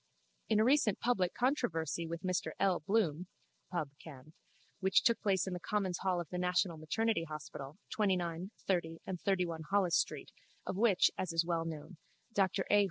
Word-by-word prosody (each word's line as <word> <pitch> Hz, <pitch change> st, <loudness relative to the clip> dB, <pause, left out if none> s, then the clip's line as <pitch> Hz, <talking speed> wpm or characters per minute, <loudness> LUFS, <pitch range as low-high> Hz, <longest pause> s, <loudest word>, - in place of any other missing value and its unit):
In 215 Hz, -1 st, +4 dB
a -, -, +5 dB
recent 245 Hz, -5 st, +3 dB
public 190 Hz, -7 st, +1 dB
controversy 170 Hz, -, 0 dB
with 170 Hz, +1 st, -5 dB
Mr 185 Hz, -1 st, -1 dB
L. 190 Hz, -2 st, +3 dB
Bloom 180 Hz, -2 st, 0 dB, 0.4 s
(Pubb. 160 Hz, -6 st, -2 dB
Canv.) 150 Hz, -1 st, -12 dB, 0.5 s
which 190 Hz, 0 st, +4 dB
took 235 Hz, -3 st, +3 dB
place 195 Hz, -3 st, +2 dB
in 190 Hz, -, -3 dB
the 180 Hz, -, -3 dB
commons' 190 Hz, -2 st, -1 dB
hall 185 Hz, -2 st, +1 dB
of 170 Hz, -, -4 dB
the 180 Hz, -, -3 dB
National 180 Hz, -1 st, +1 dB
Maternity 190 Hz, +3 st, 0 dB
Hospital, 150 Hz, -1 st, -7 dB
29, 180 Hz, -3 st, 0 dB, 0.2 s
30 170 Hz, -4 st, 0 dB
and 180 Hz, -2 st, -5 dB
31 180 Hz, -4 st, 0 dB
Holles 195 Hz, -4 st, +3 dB
street, -, -, -1 dB, 0.3 s
of -, -, -3 dB
which, 200 Hz, -2 st, +4 dB
as 185 Hz, -, -1 dB
is 165 Hz, 0 st, +2 dB
well 165 Hz, -1 st, 0 dB
known, 160 Hz, +2 st, -7 dB, 0.4 s
Dr 195 Hz, -1 st, +1 dB
A. 205 Hz, -, +7 dB
180 Hz, 170 wpm, -34 LUFS, 165-200 Hz, 0.5 s, A